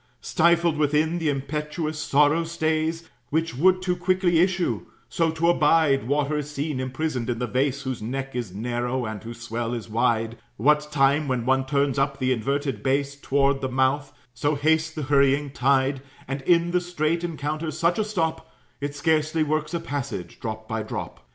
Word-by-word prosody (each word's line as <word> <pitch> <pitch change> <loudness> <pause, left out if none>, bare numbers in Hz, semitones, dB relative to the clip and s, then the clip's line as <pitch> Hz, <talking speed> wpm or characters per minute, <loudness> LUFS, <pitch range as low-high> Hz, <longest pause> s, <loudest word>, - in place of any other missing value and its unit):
Stifled 170 -1 +3
within, 155 +3 +2
the 160 -2 0
impetuous 150 +3 -3
sorrow 150 +2 +3
stays, 160 0 -1 0.2
Which 165 -1 -1
would 185 +6 +3
too 180 -1 +1
quickly 180 -1 +2
issue; 180 0 +1 0.2
so 165 -1 +1
to 160 +1 0
abide 150 -5 +3
Water 145 +2 +1
is 145 0 -5
seen, 150 -1 -3
imprisoned 130 -1 -2
in 120 - -1
the 125 - -1
vase, 135 +3 0
Whose 130 -3 -4
neck 135 +4 -4
is 120 -6 -3
narrow 120 +4 -2
and 110 -2 -6
whose 115 +1 -8
swell 120 0 -3
is 115 -2 -7
wide; 115 0 0 0.2
What 150 +5 +2
time, 140 +1 +3
when 125 -3 -1
one 130 +1 +2
turns 140 -1 +1
up 140 0 0
the 130 -1 0
inverted 135 0 -1
base, 140 +2 0
Toward 140 0 +1
the 130 - -1
mouth, 130 +2 +1 0.2
so 145 +3 0
hastes 160 +2 +2
the 155 -2 -5
hurrying 140 0 +3
tide, 135 +1 +2 0.3
And 135 +1 -3
in 170 0 +4
the 180 0 +2
strait 170 -1 -1
encounters 155 -1 -3
such 170 +5 +2
a - - +3
stop, 160 -6 -2 0.3
It 145 0 -4
scarcely 155 +1 +1
works 155 +1 -1
a - - 0
passage, 145 - -5
drop 110 -1 -5
by 110 0 -2
drop. 110 - -6
145 Hz, 175 wpm, -25 LUFS, 130-160 Hz, 0.3 s, in